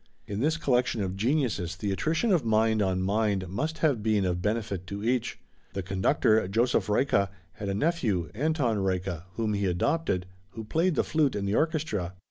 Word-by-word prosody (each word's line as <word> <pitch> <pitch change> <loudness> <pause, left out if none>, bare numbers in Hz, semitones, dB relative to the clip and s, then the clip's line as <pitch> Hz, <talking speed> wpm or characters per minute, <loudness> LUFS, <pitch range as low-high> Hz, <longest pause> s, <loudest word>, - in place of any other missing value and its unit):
In 100 0 -4
this 155 +6 +1
collection 125 -7 +1
of 95 -1 -3
geniuses 110 - 0
the 100 +2 -3
attrition 160 - 0
of 165 -7 +2
mind 110 -1 +2
on 95 -2 +1
mind 100 -1 0
must 150 - -3
have 135 -8 +2
been 105 -2 +2
of 90 -1 -1
benefit 105 -3 -2
to 100 +2 -5
each. 125 +1 0 0.3
The 95 -1 -3
conductor, 95 +3 +2
Joseph 115 +6 +1
Reicha, 105 -3 +2 0.2
had 100 0 -6
a 100 - -1
nephew, 110 - 0
Anton 140 -3 0
Reicha, 95 -3 -2
whom 110 -1 -1
he 100 -1 0
adopted, 95 - 0 0.3
who 110 - -6
played 165 +10 +1
the - - +2
flute 155 -4 +1
in 100 -1 -2
the 100 - 0
orchestra. 145 - 0
105 Hz, 180 wpm, -28 LUFS, 95-135 Hz, 0.3 s, of